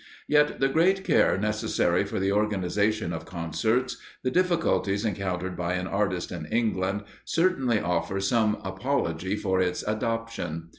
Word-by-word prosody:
Yet 150 0 +3
the 135 - +4
great 180 +7 +3
care - - +3
necessary 105 +2 +1
for - - -3
the 95 +1 +1
organisation 105 -1 0
of 80 -1 -5
concerts, 105 +9 -1 0.3
the 130 - 0
difficulties 165 - +1
encountered 95 -3 -2
by 90 0 -2
an 90 0 -2
artist 95 -2 -1
in 85 -3 -5
England, 105 -3 0 0.2
certainly 135 - +2
offer 90 +2 -1
some 110 +1 +2
apology 95 - -1
for 95 -3 0
its 90 -1 -1
adoption. 110 -7 -3
105 Hz, 140 wpm, -27 LUFS, 90-115 Hz, 0.3 s, the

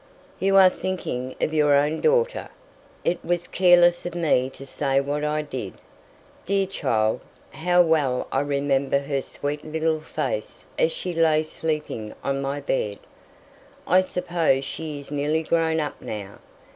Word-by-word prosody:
"You 195 +1 +2
are 190 -1 +8
thinking 130 -11 -4
of 155 - 0
your 150 -2 +4
own 150 +3 +1
daughter. 485 +1 +1 0.6
It 175 +1 0
was 175 0 -1
careless 175 -1 +5
of 175 -1 -5
me 150 -6 +2
to 135 - -11
say 135 0 0
what 145 +2 -2
I 150 0 0
did. 130 -9 -6 0.7
Dear 195 +1 +1
child! 110 - 0 0.3
how 180 +2 +3
well 150 -6 +1
I 135 - +1
remember 140 -1 +1
her 140 0 -2
sweet 145 +2 -5
little 160 0 -1
face 330 - -4
as - - +3
she 185 - -4
lay 160 -2 +3
sleeping 150 -9 -4
on 135 0 -1
my 140 +1 -2
bed. 110 -7 -1 0.9
I 185 +2 +5
suppose 175 -7 0
she 155 +2 -5
is 140 0 -10
nearly 150 +2 0
grown 160 0 +1
up 150 -1 -4
now. 100 -2 -7
155 Hz, 150 wpm, -24 LUFS, 140-175 Hz, 0.9 s, are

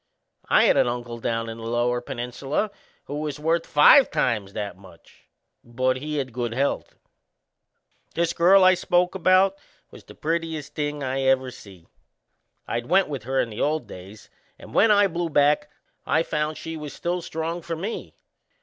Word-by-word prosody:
I - - +5
had - - +4
an - - +4
uncle 120 -1 -4
down 115 0 -2
in 115 0 -7
the - - -9
Lower 120 +1 0
Peninsula 135 - -3 0.3
who 145 +1 -5
was 150 -2 -4
worth 165 +2 0
five 255 - +7
times 105 -5 -1
that 100 -3 -4
much 95 -3 -19 0.4
but 130 +2 -1
he 150 +3 -4
had 130 -4 -3
good 120 -1 -3
health! 140 +2 -1 1.2
This 170 0 0
girl 190 +3 +5
I 185 0 +7
spoke 180 0 +1
about 190 +2 +3 0.3
was - - -14
the - - -15
prettiest 160 -2 -3
thing 145 -1 -3
I 135 +1 -2
ever 130 -1 +2
see. 95 -8 -14 0.8
I'd 120 +1 -3
went 190 -1 +3
with 135 -7 -5
her 135 +1 0
in 115 - -1
the 105 - -5
old 150 -3 0
days, 100 +1 -12 0.3
and - - -13
when 225 - +4
I 205 -1 +5
blew 175 -2 -2
back 150 0 +2 0.3
I 160 - +1
found 150 -1 -2
she 165 0 -6
was 150 -3 -7
still 175 +1 -3
strong 165 +1 -4
for 165 +1 -4
me. 195 +8 -6
145 Hz, 175 wpm, -24 LUFS, 120-165 Hz, 1.2 s, five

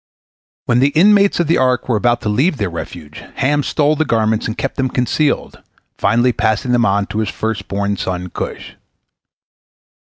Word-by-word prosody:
When 120 0 +2
the 135 +2 +4
inmates 200 +2 +4
of 175 - +2
the 165 +3 +2
ark 130 -1 +1
were 120 - +1
about 120 +3 +1
to - - -4
leave 140 - +1
their 100 -6 -2
refuge, 80 -2 -8
Ham 145 +2 +1
stole 150 +1 +1
the 155 - +1
garments 110 -4 0
and 110 - -5
kept 135 - -3
them 130 -1 0
concealed, 130 +5 -1 0.4
finally 120 +2 +2
passing 110 +3 0
them 120 -1 +3
on 100 +1 +1
to 105 - -4
his 110 -3 -1
first 110 +1 -4
born 100 +1 -1
son 90 -1 -4
Cush. - - -6
120 Hz, 175 wpm, -17 LUFS, 105-140 Hz, 0.4 s, the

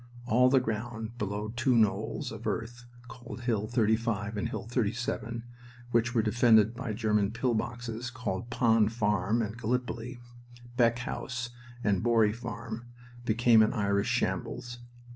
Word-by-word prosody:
All 125 +1 +4
the 135 0 +5
ground 115 0 -4
below 105 +1 -2
two 125 +1 +2
knolls 110 -3 +1
of - - -6
earth 120 +2 -3 0.2
called 120 0 -9
Hill 110 -4 0
35 110 -2 0
and 105 - -2
Hill - - -5
37, 120 0 -2 0.5
which 120 +1 +2
were 115 - +3
defended 110 -1 +5
by 120 -1 -4
German 105 -2 +1
pill 120 +2 0
boxes 120 +1 -3
called 115 -2 -4
Pond 115 -3 +3
Farm 105 0 +1
and 110 +2 -5
Gallipoli, 125 +1 -2 0.6
Beck 115 -2 +4
House 120 0 -4 0.3
and 100 -3 +2
Borry 115 -3 +3
Farm, 115 0 -6 0.4
became 115 0 +5
an 110 - +3
Irish 100 -2 +1
shambles. 120 0 -2
115 Hz, 140 wpm, -30 LUFS, 110-120 Hz, 0.6 s, the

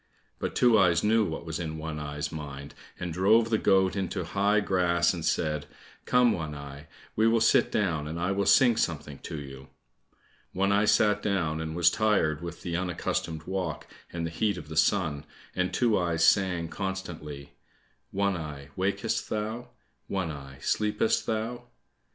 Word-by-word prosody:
But - - -3
Two 120 -3 +5
eyes 85 -3 +3
knew 110 +1 +4
what 80 -1 -5
was 80 -1 -4
in 80 -2 -4
One 80 -1 -5
eye's 75 0 -4
mind, 70 -2 -7 0.3
and 90 -2 -4
drove 110 +6 +3
the 110 - +3
goat 95 -2 +3
into 95 -1 -2
high 100 +4 +2
grass 90 -4 +2
and 85 -3 -5
said, 75 -2 0 0.4
"Come, 125 -1 +4
One 80 -6 -3
eye, 70 +1 -9 0.3
we 110 +1 +3
will 115 0 +4
sit 110 - +4
down, 85 -8 0
and 80 +2 -5
I 90 +3 0
will 100 0 0
sing 120 -4 +5
something 75 -8 -2
to 80 - -6
you." 65 -1 -10 0.9
One 100 +2 +1
eye 100 +1 +3
sat 105 -1 +3
down 85 -6 -1
and 80 0 -4
was 85 0 +5
tired 95 -9 +1
with 85 -1 -7
the 85 -1 -3
unaccustomed 85 -2 -2
walk 90 -3 -3 0.3
and 85 -1 -3
the 80 - -4
heat 100 +3 0
of 75 -3 -9
the 80 - -6
sun, 80 -2 +2 0.3
and 90 0 0
Two 120 -4 +2
eyes 85 -2 +1
sang 90 -4 +2
constantly, 80 -7 -6 0.6
"One 100 0 0
eye, 75 -4 -7
wakest 100 +4 -1
thou? 110 +3 -3 0.4
One 95 -5 -2
eye, 70 -2 -9
sleepest 105 +1 +1
thou?" 115 +2 -3
90 Hz, 170 wpm, -28 LUFS, 80-100 Hz, 0.9 s, Two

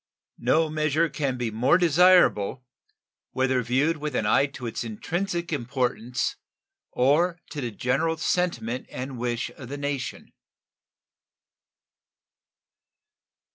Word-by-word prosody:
No 155 +7 +3
measure 155 +1 +1
can 140 -5 -2
be 120 -2 -2
more 125 +10 +3
desirable, 175 - +4 0.7
whether 130 -1 +1
viewed 135 +7 +1
with 150 0 -4
an 110 - 0
eye 135 +6 +4
to 135 -3 -9
its 115 - -3
intrinsic 170 - -3
importance 125 -2 -1 0.5
or 165 +7 +2
to 150 - -4
the 120 - -2
general 130 +9 0
sentiment 130 -9 -1
and 130 -1 -6
wish 120 0 -2
of 125 0 -11
the 145 - -5
nation. 140 -2 -4
135 Hz, 110 wpm, -26 LUFS, 125-160 Hz, 0.7 s, desirable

